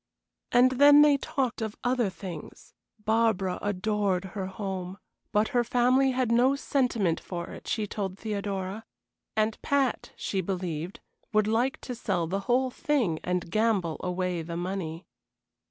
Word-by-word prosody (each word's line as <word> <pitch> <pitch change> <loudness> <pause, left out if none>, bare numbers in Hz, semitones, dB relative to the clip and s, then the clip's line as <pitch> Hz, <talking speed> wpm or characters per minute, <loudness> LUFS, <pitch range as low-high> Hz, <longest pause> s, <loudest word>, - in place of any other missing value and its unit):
And 250 +1 +6
then 285 +3 +8
they 295 -1 +6
talked 260 -4 -2
of 220 -1 -3
other 245 -4 +1
things. 185 -4 -9 0.3
Barbara 220 -5 +2
adored 205 -1 0
her 195 -2 -3
home, 190 -1 -5 0.3
but 210 0 +2
her 245 -1 +2
family 250 +3 +3
had 255 -2 0
no 250 +4 +4
sentiment 240 - +1
for 175 -2 -6
it, - - -10
she 215 - 0
told 195 -2 -4
Theodora; 200 -1 -3 0.5
and 215 0 +1
Pat, 275 -3 0
she 195 - -2
believed, 180 -2 -4 0.3
would 215 -1 +4
like 230 +5 +1
to 250 - -5
sell 190 -7 -1
the 190 +4 -2
whole 255 +1 +3
thing 245 - 0
and 180 -1 -2
gamble 215 -7 +1
away 180 -1 -1
the 170 +1 -5
money. 175 -2 -4
210 Hz, 145 wpm, -28 LUFS, 185-245 Hz, 0.5 s, then